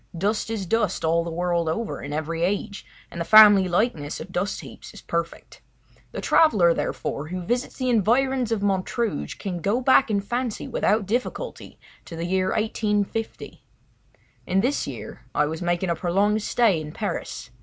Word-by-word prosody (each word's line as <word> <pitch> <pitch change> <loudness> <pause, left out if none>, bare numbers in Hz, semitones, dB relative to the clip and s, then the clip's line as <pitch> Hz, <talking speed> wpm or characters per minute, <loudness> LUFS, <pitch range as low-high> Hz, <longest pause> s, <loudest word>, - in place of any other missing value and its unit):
Dust 210 +5 -1
is 220 -4 -3
dust 210 -3 0
all 165 +1 +2
the 170 - -5
world 170 -1 -1
over, 220 +7 -3
in 140 - -7
every 155 +2 -3
age, 200 +3 -2 0.2
and 170 - -5
the - - +1
family 205 -1 +8
likeness 175 -6 -1
of 185 - -9
dust 185 +3 -2
heaps - - -12
is - - -11
perfect. - - -5 0.5
The - - -5
traveller, 200 - +4
therefore, 145 -1 -3
who 180 +2 -5
visits 245 +6 -2
the 255 - -2
environs 245 +2 +2
of 215 -3 -1
Montrouge 205 +3 -1
can 185 -3 -4
go 200 +5 +1
go 250 - -1
back 260 0 +4
in 205 -2 +1
fancy 240 +3 -3
without 210 -1 +1
difficulty 250 - -4 0.3
to 165 - -9
the 165 +1 -4
year 185 +1 0
1850. 215 +1 -2 0.8
In 190 +1 +2
this 260 +6 0
year - - -8
I 150 - +3
was 160 +3 -4
making 175 +1 0
a - - 0
prolonged 200 +5 +1
stay 210 -6 +2
in 150 0 -8
Paris. 200 - -5
200 Hz, 175 wpm, -24 LUFS, 170-225 Hz, 0.8 s, family